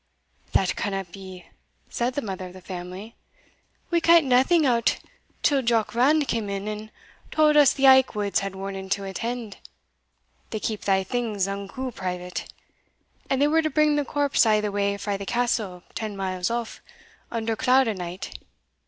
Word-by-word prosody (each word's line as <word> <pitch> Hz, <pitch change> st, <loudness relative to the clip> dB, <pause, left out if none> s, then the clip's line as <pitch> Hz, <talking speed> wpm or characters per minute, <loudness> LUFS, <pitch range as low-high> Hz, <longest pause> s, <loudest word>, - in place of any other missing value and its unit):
"That 190 Hz, -1 st, +2 dB
canna 195 Hz, -1 st, -2 dB
be," 185 Hz, 0 st, -11 dB, 0.5 s
said 245 Hz, +1 st, -1 dB
the 285 Hz, -, -2 dB
mother 190 Hz, -3 st, -5 dB
of 180 Hz, -, -12 dB
the 185 Hz, -, -11 dB
family; 185 Hz, +4 st, -8 dB, 0.8 s
"we 340 Hz, -1 st, +2 dB
kent 335 Hz, -1 st, +6 dB
naething 270 Hz, +6 st, +4 dB
o't 235 Hz, -3 st, +2 dB, 0.5 s
till 280 Hz, -3 st, +3 dB
Jock 230 Hz, -3 st, +1 dB
Rand 280 Hz, +5 st, +3 dB
cam 220 Hz, -3 st, -1 dB
in, 200 Hz, +1 st, -4 dB
and 215 Hz, 0 st, -5 dB, 0.4 s
tauld 305 Hz, -1 st, +3 dB
us 290 Hz, -3 st, +7 dB
the 275 Hz, -, 0 dB
Aikwoods 255 Hz, -7 st, +5 dB
had 195 Hz, -1 st, -5 dB
warning 195 Hz, 0 st, -6 dB
to 200 Hz, +1 st, 0 dB
attend 225 Hz, +2 st, -4 dB, 0.9 s
they 215 Hz, -, -3 dB
keep 215 Hz, 0 st, -3 dB
thae 190 Hz, -1 st, +2 dB
things 215 Hz, -2 st, -1 dB
unco 200 Hz, +6 st, -5 dB
private 180 Hz, -3 st, -5 dB, 0.8 s
and 265 Hz, -, +1 dB
they 290 Hz, -, +4 dB
were 320 Hz, +2 st, +3 dB
to 310 Hz, -, 0 dB
bring 305 Hz, 0 st, +3 dB
the 295 Hz, -, +1 dB
corpse 285 Hz, 0 st, +2 dB
a' 215 Hz, -2 st, +4 dB
the 210 Hz, -1 st, -2 dB
way 200 Hz, 0 st, 0 dB
frae 200 Hz, 0 st, -2 dB
the 200 Hz, -, -6 dB
Castle, 225 Hz, -7 st, -1 dB
ten 215 Hz, -2 st, -4 dB
miles 185 Hz, -2 st, -2 dB
off, 235 Hz, -1 st, -4 dB, 0.5 s
under 225 Hz, -1 st, -2 dB
cloud 255 Hz, +3 st, +3 dB
o' 220 Hz, -, 0 dB
night. 180 Hz, -1 st, -6 dB
215 Hz, 170 wpm, -25 LUFS, 195-260 Hz, 0.9 s, us